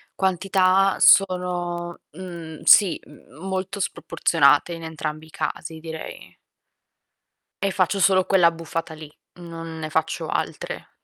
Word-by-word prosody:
quantità 190 0 +2
sono 180 -2 +2
mhmm, 170 -2 -9
sì 195 -5 +6
m 145 -4 -18
molto 190 +1 -3
sproporzionate 145 -3 +2
in 165 -1 -7
entrambi 155 -1 -5
i - - -19
casi 160 +1 -5
direi. 160 -1 -9 1.3
E 195 - +1
faccio 190 +1 0
solo 185 0 +4
quell'abbuffata 165 -3 +1
lì, 155 -1 -11 0.3
non 165 -1 -8
ne 155 -1 -5
faccio 160 0 -2
altre. - - -4
175 Hz, 115 wpm, -23 LUFS, 160-185 Hz, 1.3 s, sì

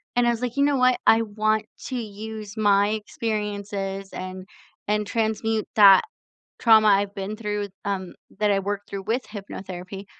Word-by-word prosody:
And 245 0 +3
I - - +5
was 235 - -3
like, 245 +2 -3
"You 280 - +4
know 285 -1 +2
what, 255 -1 +4
I 225 +1 +6
want 215 0 0 0.2
to 260 - -4
use 215 -1 -6
my 205 -1 +4
experiences 205 -3 -3
and 185 0 -6 0.4
and 210 -1 0
transmute 220 -1 -1
that 200 -2 +8 0.6
trauma 220 -2 +6
I've 200 0 +3
been 200 +2 -5
through, 210 -2 -3 0.2
um, 190 -2 -3 0.3
that 210 -1 +2
I 200 -1 +3
worked 200 +1 -4
through 195 -1 -5
with 235 +5 -1
hypnotherapy 195 -2 -8
210 Hz, 165 wpm, -24 LUFS, 200-220 Hz, 0.6 s, that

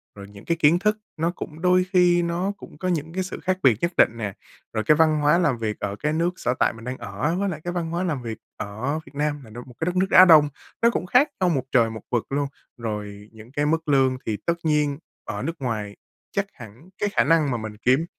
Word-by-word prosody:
rồi 100 0 -10
những 100 -1 -14
cái 170 - 0
kiến 165 +3 +5
thức 210 +2 +1 0.2
nó 165 +2 0
cũng 160 -3 -8
đôi 180 0 +4
khi 175 -1 +5
nó 170 +3 -1
cũng 150 - -13
có 185 - -3
những 165 -2 -2
cái 185 +1 -1
sự 185 - -6
khác 185 0 -1
biệt 120 -6 +5
nhất 170 - +1
định - - +6
nè. 105 -4 -3 0.4
Rồi 110 -1 -1
cái 150 - +4
văn 155 -1 +4
hóa 150 +3 +4
làm 150 -8 +2
việc 110 -2 -3
ở 100 -1 -3
cái 150 +8 -2
nước 165 +2 +1
sở 125 - 0
tại - - +3
mình 115 0 -12
đang 125 +1 -4
ở 160 +3 -2
với 200 0 0
lại 155 -3 -5
cái 175 - -3
văn 170 -2 -2
hóa 175 +2 -1
làm 150 -8 -2
việc 115 -2 -5 0.2
ở 125 +10 -3
Việt - - -16
Nam 145 -1 -1
là 110 - -14
nơi 120 +3 -9
một 125 - -14
cái 160 - -1
đất 180 +1 -1
nước 190 +1 +2
Á 185 - +9
Đông, 155 -4 +7 0.3
nó 235 - +6
cũng 235 - -2
khác 250 +10 +4
nhau 180 - +4
một 135 -6 0
trời 115 -3 +4
một 110 -1 -7
vực 120 -2 0
luôn. 145 0 0 0.3
Rồi 105 -2 -6
những 110 +2 -14
cái 145 +1 0
mức 160 +1 0
lương 135 -2 +3
thì 105 -2 -1
tất 170 - +2
nhiên 150 -3 +1 0.3
ở - - -4
nước 165 - -3
ngoài 105 -5 -3 0.4
chắc 200 - 0
hẳn 120 - -13
cái 205 - 0
khả - - +2
năng 155 -2 +3
mà 120 - 0
mình 110 -1 -7
kiếm 130 +8 +2
150 Hz, 265 wpm, -24 LUFS, 115-170 Hz, 0.4 s, Á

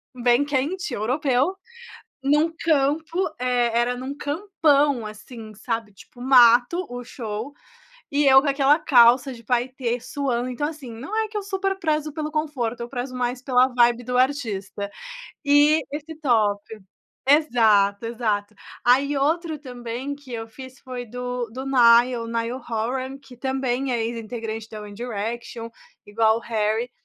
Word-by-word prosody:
bem 245 +2 +3
quente 295 +4 -2
europeu, 260 - 0 0.7
em 280 +2 +4
um 320 +2 +2
campo, 315 +2 +1 0.2
eh, 245 -2 +1
era 240 +1 +1
em 245 - -7
um 275 +2 -5
campão, 290 - +1
assim, 215 +1 -10
sabe, 225 0 -4
tipo 240 +5 -17
mato, 250 +6 +5
o 245 0 -6
show, 230 +1 -6 0.6
e 290 +1 +2
eu 265 0 +8
com 295 - -1
aquela 280 +2 +4
calça 250 -2 +5
de 230 -1 -14
paetê, 245 0 -1
suando. 250 -1 -2
Então 270 +4 -2
assim, 300 -6 -9
não 255 - -7
é 440 -1 0
que 435 - -8
eu 415 - -1
super 390 -1 -2
prezo 310 -3 -1
pelo 305 -1 -3
conforto, 280 -7 -2
eu 235 - -5
prezo 255 0 -5
mais 250 0 -2
pela 255 -1 +3
vibe 240 -1 +2
do 250 +1 -2
artista. 215 -7 -1 0.6
E 290 +2 +5
esse 305 +2 -6
top 215 -7 +2 0.7
exato, 225 -8 +4
exato. 215 -3 -2 0.3
Aí 275 +4 +3
outro 315 +3 0
também 250 0 -6
que 280 -3 -13
eu 225 -1 -5
fiz, 260 +3 -12
foi 250 -2 -7
do 245 +1 -4
do 260 +3 -6
Niall, 240 -2 +5
o - - -7
Niall 230 +2 -3
Horan, 255 +4 -2
que 270 -3 -16
também 265 0 -1
é 235 -2 0
ex-integrante 225 -1 -5
da 215 -1 -8
One 205 0 -9
Direction, 230 +1 -5 0.4
igual 220 +1 +2
o - - -11
Harry. 225 +1 -1
250 Hz, 155 wpm, -23 LUFS, 230-285 Hz, 0.7 s, eu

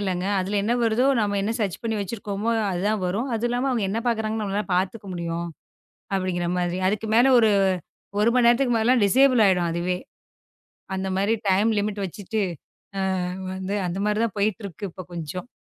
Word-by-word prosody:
இல்லங்க. 185 -2 -1
அதுல 195 +2 -1
என்ன 225 +3 +1
வருதோ 230 +4 +2
நாம 205 -1 0
என்ன 210 +3 0
சேர்ச் 195 -5 -2
பண்ணி 225 -2 -1
வச்சிருக்கோம். 200 +1 -4 0.2
அது 175 -1 -2
தான் 215 -2 0
வரும். 215 +9 -1
அது 230 +2 0
இல்லாம 245 +3 0
அவங்க 230 -5 0
என்ன 220 +3 -1
பாக்குறாங்கன்னு 215 -2 -1
பாத்துக்க 195 +3 -1
முடியும். 170 0 -3 0.7
அப்படிங்கற 185 -2 -1
மாதிரி. 175 0 -1
அதுக்கு 215 +2 -1
மேல 255 +3 +5
ஒரு 225 -2 +5 0.7
1 215 - +4
மணி 245 -2 +4
நேரத்துக்கு 240 0 +4
மேல 225 +2 +3
டிஸேபுல் 255 +3 +4
ஆயிடும் 180 -3 +3
அதுவே, 175 +2 -1 1.0
அந்த 190 0 -2
மாரி 200 +4 +2 0.2
டைம் 200 +4 +3
லிமிட் 205 0 -2
வச்சிட்டு 205 +4 -4 0.6
அ - - 0 0.5
வந்து 190 +2 -3
அந்த 175 +2 -3
மாரி 210 0 +1
தான் 220 -2 -3
போயிட்டு 205 0 0
இருக்கு. 195 +2 -8
இப்ப 185 +2 -9
கொஞ்சம். 170 - -5
205 Hz, 175 wpm, -24 LUFS, 185-225 Hz, 1.0 s, மேல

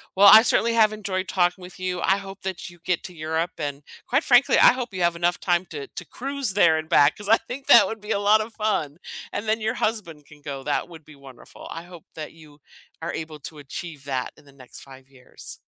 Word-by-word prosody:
Well, 200 +2 +7
I 220 - +10
certainly 235 0 +1
have 215 -2 +4
enjoyed 195 -3 -3
talking 180 0 0
with 180 0 -11
you. 185 -1 -3
I 190 - +2
hope 195 0 -10
that 190 -2 -5
you 175 0 -17
get 180 -2 -1
to 180 - -9
Europe, 160 +2 -2
and 145 -2 -5 0.2
quite 270 +5 +1
frankly, 245 0 +4
I - - +8
hope 250 -4 -5
you 185 - -4
have 170 0 +1
enough 175 +1 +1
time 175 0 0
to 145 -3 -6
to 180 - -9
cruise 270 - -3
there 170 -5 +4
and 155 0 -5
back 145 0 +4
'cause 205 - -8
I 225 +2 +6
think 250 +4 -9
that 220 -4 +8
would 220 -1 -6
be 210 +1 -6
a - - +1
lotta 215 +2 +3
fun, 180 -9 -2 0.3
and 205 - -4
then 220 +1 +1
your 220 0 -1
husband 170 -10 -3
can 150 -1 -17
go. 140 -2 -7
That 145 +4 -1
would 165 -2 -13
be 150 0 -16
wonderful, 135 -3 -14
I 165 - -7
hope 175 -2 -14
that 155 -1 -7
you 155 -2 -18 0.4
are 165 +1 -4
able 155 -1 -7
to 155 - -10
achieve 145 0 -8
that 130 -2 -3
in - - -20
the 140 - -19
next 130 -2 -14
5 135 -1 -15
years. 130 -2 -13
175 Hz, 240 wpm, -24 LUFS, 150-210 Hz, 0.4 s, I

